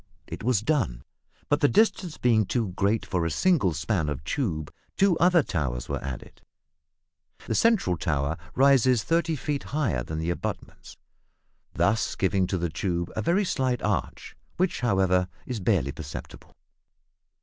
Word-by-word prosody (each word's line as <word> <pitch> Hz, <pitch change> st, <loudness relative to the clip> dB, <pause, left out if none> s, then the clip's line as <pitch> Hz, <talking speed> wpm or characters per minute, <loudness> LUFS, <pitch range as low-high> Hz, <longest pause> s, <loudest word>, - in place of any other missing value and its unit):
It -, -, -8 dB
was 120 Hz, -3 st, +2 dB
done; 110 Hz, -, 0 dB, 0.4 s
but 145 Hz, -, +2 dB
the 145 Hz, -, +4 dB
distance 190 Hz, -3 st, +2 dB
being 115 Hz, -3 st, +3 dB
too 115 Hz, -5 st, -1 dB
great 100 Hz, +4 st, 0 dB
for 90 Hz, -3 st, -1 dB
a 85 Hz, -, 0 dB
single 140 Hz, -, +2 dB
span 80 Hz, +2 st, -1 dB
of 75 Hz, -1 st, -4 dB
tube, 85 Hz, -, -2 dB, 0.2 s
two 195 Hz, -3 st, +4 dB
other 175 Hz, -2 st, +5 dB
towers 65 Hz, -, -3 dB
were -, -, -3 dB
added. 65 Hz, -3 st, -7 dB, 1.0 s
The -, -, -2 dB
centre 225 Hz, -, +3 dB
towel 75 Hz, -2 st, -1 dB, 0.2 s
rises 130 Hz, -4 st, +4 dB
35 165 Hz, 0 st, 0 dB
feet 145 Hz, -2 st, -1 dB
higher 125 Hz, -, -1 dB
than 80 Hz, +5 st, -5 dB
the 80 Hz, +2 st, -1 dB
abutments, -, -, -6 dB, 0.8 s
thus 110 Hz, +3 st, +1 dB
giving 95 Hz, -1 st, +1 dB
to 95 Hz, -, -1 dB
the 85 Hz, -2 st, -2 dB
tube 85 Hz, 0 st, -2 dB
a -, -, -1 dB
very 185 Hz, -, +2 dB
slight 130 Hz, -7 st, -1 dB
arch, -, -, -2 dB, 0.2 s
which, 185 Hz, 0 st, 0 dB
however, 95 Hz, -6 st, +2 dB, 0.2 s
is 125 Hz, -4 st, -4 dB
barely 90 Hz, -, +1 dB
perceptible. 70 Hz, +1 st, -9 dB
105 Hz, 150 wpm, -26 LUFS, -, 1.0 s, other